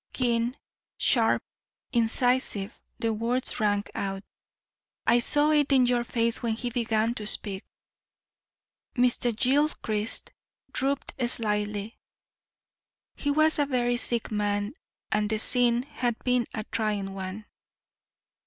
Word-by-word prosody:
Keen, 240 0 0 0.4
sharp, - - +3 0.5
incisive, 235 -3 0 0.2
the 225 -1 -1
words 235 +5 -1
rang 205 -2 +1
out. 195 0 -4 0.8
"I 240 +1 +5
saw 295 +5 +3
it 295 -2 +2
in 260 -2 +5
your 245 -1 +1
face 230 -1 +1
when 230 -2 0
he 240 +2 -3
began 230 -1 0
to 215 -4 -6
speak." 200 -2 -1 1.3
Mr. 245 -1 +2
Gilchrist 250 -5 +2 0.4
drooped 275 +1 -1 0.2
slightly; 210 -2 -1 1.2
he 290 - -2
was 310 +2 +3
a 290 - +2
very 245 -2 +1
sick 235 -2 -1
man 205 +1 -1 0.4
and 210 -1 +1
the 220 - 0
scene 240 +2 +3
had 255 -4 -2
been 250 -2 +1
a 215 - -4
trying 205 -3 -2
one. 195 +2 -6
235 Hz, 115 wpm, -27 LUFS, 210-250 Hz, 1.3 s, I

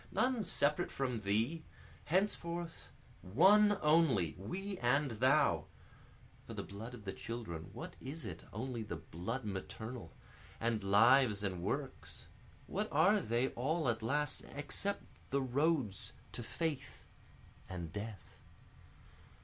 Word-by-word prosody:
None 250 -3 +2
separate 170 -2 +2
from 125 -5 -1
thee 110 +11 +1 0.4
henceforth 170 -1 -1 0.3
One 200 - +6
only, 150 - +4
we 190 - -4
and 135 +3 +2
thou, 130 +5 +3 0.8
(For - - -7
the - - -3
blood 110 +5 -8
of 110 -4 -13
the 95 - -3
children, 95 -9 -6
what - - -7
is 135 +3 -3
it, 85 -6 -6
only 120 +1 -3
the 105 - -4
blood 115 +10 -5
maternal? 105 +1 -5 0.5
And 115 -2 0
lives 105 +2 +5
and 95 -3 -2
works, 135 +8 -4 0.4
what - - -2
are 185 +8 +5
they 120 - +1
all 155 +5 0
at 115 -1 0
last, 145 +5 0
except 170 +8 -1 0.3
the 140 0 +1
roads 130 - 0 0.2
to - - -6
faith 155 +4 -3 0.6
and 85 -3 -5
death?) 105 -2 -7
125 Hz, 125 wpm, -35 LUFS, 105-160 Hz, 0.8 s, One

